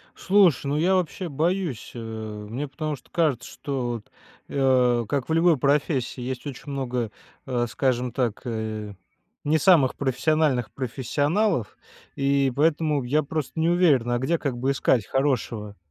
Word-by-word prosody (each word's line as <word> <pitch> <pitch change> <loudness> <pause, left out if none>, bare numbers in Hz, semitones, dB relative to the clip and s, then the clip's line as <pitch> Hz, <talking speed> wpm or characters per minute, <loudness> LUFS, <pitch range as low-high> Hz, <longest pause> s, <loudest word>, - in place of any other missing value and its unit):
Слушай, 185 - +3
ну 140 +1 0
я 175 +5 +3
вообще 180 0 -1
боюсь, 165 - -1
э, - - -7 0.5
мне 140 +6 -3
потому 155 +2 -4
что 130 - -22
кажется, 155 -8 0
что, 135 -4 -3
вот, 115 -3 -7 0.4
э, 125 -3 +3
как 140 -3 -1
в - - 0
любой 165 0 +4
профессии 140 -2 0
есть 125 +2 -5
очень 140 +1 -7
много, 125 -4 -2 0.4
э, 120 -1 0
скажем 125 0 0
так, 120 -3 -1
э, 110 -3 -4 0.5
не 155 +2 +3
самых 155 -5 +4
профессиональных 135 -2 +1
профессионалов. 145 - -1 0.4
И 140 -1 +2
поэтому 150 0 +2
я 150 +5 +2
просто 155 +2 -4
не 160 +1 +2
уверен, 160 -9 +3
а 120 - +1
где, 130 +7 +1
как 135 -6 -3
бы, 130 +3 0
искать 125 -5 +1
хорошего? 115 -6 -1
135 Hz, 150 wpm, -25 LUFS, 125-155 Hz, 0.5 s, любой